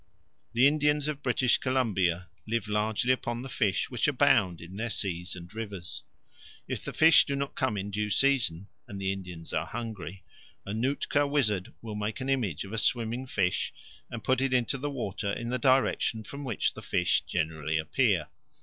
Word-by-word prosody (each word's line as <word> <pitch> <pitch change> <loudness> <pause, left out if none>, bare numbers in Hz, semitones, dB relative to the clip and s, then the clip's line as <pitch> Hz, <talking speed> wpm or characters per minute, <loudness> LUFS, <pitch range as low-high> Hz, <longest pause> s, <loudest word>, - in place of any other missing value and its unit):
The 120 +3 +5
Indians 150 0 +3
of 150 -2 -3
British 125 -1 +2
Columbia 95 -9 +1 0.2
live 115 0 -1
largely 105 +3 +1
upon 120 -1 -3
the 135 - -7
fish 105 -5 0
which 120 +1 +1
abound 130 - +3
in 85 +3 -10
their 115 +3 -2
seas 90 -5 -2
and 90 +2 -10
rivers. 100 -6 -5 0.7
If - - -4
the - - -4
fish 160 0 +7
do 140 - -2
not 140 0 -3
come 130 -7 0
in 100 +1 -4
due 105 +1 -1
season, 110 -9 +2 0.2
and 100 - -7
the 95 0 0
Indians 90 -4 -7
are - - 0
hungry, 100 -6 -6 0.4
a 100 - -4
Nootka 140 +4 +1
wizard 110 -10 +1
will 110 -2 -5
make 105 +4 -3
an 130 0 -3
image 115 - 0
of 95 - -9
a 115 - 0
swimming 120 +3 0
fish 95 -7 0 0.4
and 115 -2 -6
put 130 +2 +2
it 135 -1 +2
into 125 +2 +1
the 145 +2 -2
water 100 -7 -3
in 120 +1 -4
the 125 - 0
direction 130 -4 +2
from 140 +5 -8
which 120 -6 0
the - - -9
fish 90 - +2
generally 80 -2 -1
appear. 80 -1 +1
115 Hz, 185 wpm, -29 LUFS, 95-130 Hz, 0.7 s, fish